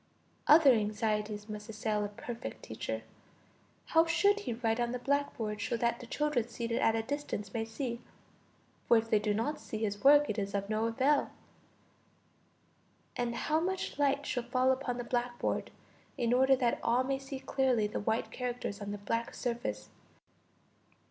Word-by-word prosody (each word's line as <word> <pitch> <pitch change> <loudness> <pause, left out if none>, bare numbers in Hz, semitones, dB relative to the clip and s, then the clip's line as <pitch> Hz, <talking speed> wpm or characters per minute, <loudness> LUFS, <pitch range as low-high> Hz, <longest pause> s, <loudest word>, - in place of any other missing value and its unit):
Other 300 -2 +8
anxieties 210 -1 -1
must 210 0 -7
assail 215 -1 -1
a - - -1
perfect 230 +3 -7
teacher! - - -4 0.9
How 325 +1 +5
should 400 +5 +3
he 250 - -3
write 225 0 0
on 240 0 0
the - - -1
blackboard 245 -6 -1
so 235 - -1
that 235 0 0
the 245 - -9
children 290 -4 0
seated 235 0 -2
at 225 - +3
a 225 - 0
distance 260 -7 -4
may 225 -1 -1
see? 235 +1 -4 0.9
for 235 - +6
if 225 0 -1
they 215 - +5
do 210 0 0
not 230 +9 -1
see 220 - -6
his 205 -1 -2
work 290 +1 +7
is 200 -1 -2
of 200 +1 -2
no 215 +1 +1
avail. 270 +5 +2 1.9
And 240 -1 -1
how 310 +6 +1
much 370 -2 -2
light 285 0 +2
shall 250 - -1
fall 255 +2 +2
upon 260 -2 -1
the 245 - -3
blackboard, 240 0 -1 0.5
in 235 0 +1
order 265 +2 +5
that 245 -2 +1
all 245 +2 +2
may 270 +1 -1
see 270 0 -7
clearly 260 -5 +1
the 210 - -2
white 220 +2 -1
characters 245 -4 -4
on 205 - -4
the 205 - -3
black 230 +3 -2
surface? 105 - -3
235 Hz, 170 wpm, -32 LUFS, 215-265 Hz, 1.9 s, Other